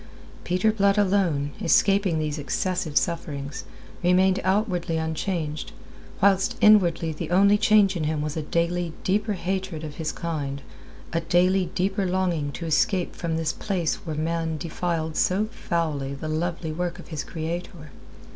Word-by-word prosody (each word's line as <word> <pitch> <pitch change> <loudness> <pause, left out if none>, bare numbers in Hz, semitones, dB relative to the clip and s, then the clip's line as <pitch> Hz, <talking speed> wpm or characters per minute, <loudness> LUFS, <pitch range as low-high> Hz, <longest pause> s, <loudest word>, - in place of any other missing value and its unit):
Peter 185 +5 +2
Blood 200 -1 +2
alone, 185 -8 +2
escaping 195 0 +3
these 155 -1 -2
excessive 175 +1 -1
sufferings, 145 -4 -2 0.4
remained 185 +2 +3
outwardly 185 -4 0
unchanged, 160 -1 -3 0.5
whilst 200 +4 +3
inwardly 175 -7 +4
the 155 - -5
only 200 +3 +5
change 210 -2 +4
in 160 -3 -1
him 155 0 -1
was 150 0 -3
a 160 - -1
daily 170 +2 -1
deeper 210 +3 +1
hatred 190 -3 -3
of 150 -1 -7
his 160 -1 -2
kind, 145 -5 -4 0.5
a 165 - +2
daily 180 +2 +2
deeper 195 +1 0
longing 180 -5 0
to 170 - -6
escape 175 +3 +1
from 165 -2 -2
this 160 -1 -1
place 180 -6 -1
where 160 -2 -4
man 160 +1 -1
defiled 160 0 -3
so 195 +4 +2
foully 155 - -2
the 150 +3 -6
lovely 165 +1 -2
work 175 +2 -3
of 175 - -12
his 155 -3 -4
Creator. 165 -1 -6
170 Hz, 145 wpm, -25 LUFS, 155-190 Hz, 0.5 s, only